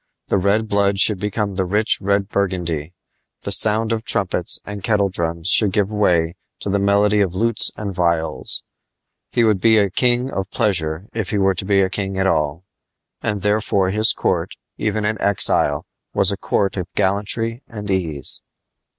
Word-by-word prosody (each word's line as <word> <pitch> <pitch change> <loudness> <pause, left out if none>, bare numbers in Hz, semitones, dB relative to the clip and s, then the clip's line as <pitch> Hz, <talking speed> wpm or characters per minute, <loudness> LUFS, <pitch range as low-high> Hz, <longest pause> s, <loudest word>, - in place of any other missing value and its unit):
The 100 - +2
red 100 +4 +1
blood 100 -1 +1
should 100 0 +4
become 105 0 -2
the 95 0 -1
rich 105 +4 0
red 100 0 0
burgundy; 90 -5 -2 0.5
the - - -4
sound 110 +1 +3
of 110 -1 -2
trumpets 95 -6 +1
and 105 -2 -7
kettledrums 95 -5 0
should 105 -3 +5
give 105 -1 0
way 90 -5 +1 0.2
to 100 - -2
the 100 - +1
melody 100 +1 +3
of 95 -3 -1
lutes 115 +2 +3
and 100 -2 -4
viols. 85 -2 -1 0.7
He 120 - +2
would 105 -4 +2
be 110 -1 +5
a 100 -3 +2
king 125 +4 +1
of 95 0 -4
pleasure 90 -6 -1
if 110 -4 -3
he 105 - -1
were 95 -1 +2
to 95 +1 -6
be 100 -1 +3
king 95 0 -3
at 95 - +1
all. 80 -2 0 0.6
And 105 -2 -2
therefore 105 -2 +1
his 110 +2 +4
court, - - -1 0.2
even 110 0 -2
in 110 -1 -2
exile, 100 -2 +2 0.3
was 95 - +3
a - - -1
court 100 0 -1
of 90 -2 -3
gallantry 105 +4 -1
and 105 -2 -6
ease. 80 -7 0
100 Hz, 170 wpm, -20 LUFS, 95-105 Hz, 0.7 s, should